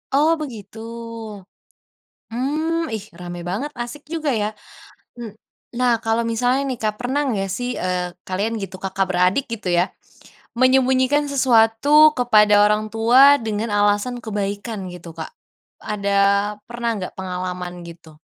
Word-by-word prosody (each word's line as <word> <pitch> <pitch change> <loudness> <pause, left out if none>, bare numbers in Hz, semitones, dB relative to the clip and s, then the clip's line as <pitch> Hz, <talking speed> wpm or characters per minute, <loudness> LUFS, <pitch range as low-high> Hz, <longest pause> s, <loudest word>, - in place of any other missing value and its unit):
Oh 300 +3 +4
begitu, 230 -7 -8 1.6
mmm, 315 +6 -1
ih, 210 - -6 0.2
rame 175 0 -7
banget 245 +11 -3
asik 240 +5 -6
juga 315 -3 -1
ya, 205 - 0 0.7
m 230 -2 -6 0.5
nah 250 -1 +3
kalau 225 +1 +1
misalnya 245 +3 +1
nih 255 -3 -3
Kak 215 -1 0
pernah 260 +4 -1
enggak 200 -7 -1
sih, 245 0 -3
eee, 180 -1 -1 0.2
kalian 200 +5 -2
gitu 190 -1 -6
Kakak 195 0 -1
beradik 185 +8 +2
gitu 215 -4 -6
ya, 175 - +4 0.7
membunyikan 260 +2 +3
sesuatu 230 -2 +3 0.3
kepada 215 -4 +5
orang 210 +1 +2
tua 230 +3 +4 0.3
dengan 215 +1 -2
alasan 205 +4 +1
kebaikan 205 -1 -4
gitu 175 -1 -11
Kak, - - -6 0.6
ada 200 -1 -2 0.6
pernah 235 0 -2
nggak 185 - -6
pengalaman 180 -1 -4
gitu? 165 -2 -14
220 Hz, 130 wpm, -21 LUFS, 195-250 Hz, 1.6 s, kepada